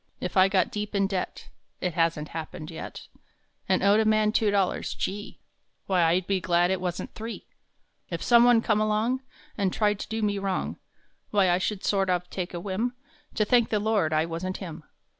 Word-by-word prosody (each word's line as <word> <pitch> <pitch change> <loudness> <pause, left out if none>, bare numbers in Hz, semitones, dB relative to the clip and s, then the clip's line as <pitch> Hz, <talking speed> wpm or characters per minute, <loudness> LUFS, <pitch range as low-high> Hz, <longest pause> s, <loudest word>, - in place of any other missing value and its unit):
If 180 - -4
I 190 0 +6
got 190 -2 +2
deep 210 0 -4
in 195 0 +3
debt 195 -2 -4 0.3
It 180 -2 -2
hasn 165 -2 +1
t - - -16
happened 160 0 -6
yet 160 - -8 0.6
And 185 -1 +2
owed 200 +2 +5
a - - +4
man 215 0 +3
two 215 -1 +2
dollars, 200 -2 0
Gee! 205 +2 -4 0.4
Why 185 -2 +2
I 170 +2 +4
d - - -20
be 195 -2 +1
glad 175 0 +2
it 190 -1 -1
wasn 180 -1 -2
t - - -18
three! 225 +1 -7 0.6
If - - -4
some 235 -1 +6
one 240 -2 +5
come 215 -2 +2
along, 215 +4 +1 0.4
And 195 -2 +2
tried 210 0 +1
to - - -6
do 220 0 -2
me 205 -1 +1
wrong, 195 -1 -2 0.5
Why 195 -3 +3
I 175 - +2
should 195 +1 -2
sort 195 -2 +1
of 180 -1 0
take 180 -1 -4
a - - -3
whim 205 +7 -2 0.4
To 215 - +2
thank 240 +1 +3
the 215 - +1
Lord 210 -7 +1
I 155 +1 +2
wasn 170 +3 -4
t 190 - -6
him. 160 -3 -9
195 Hz, 215 wpm, -27 LUFS, 180-215 Hz, 0.6 s, I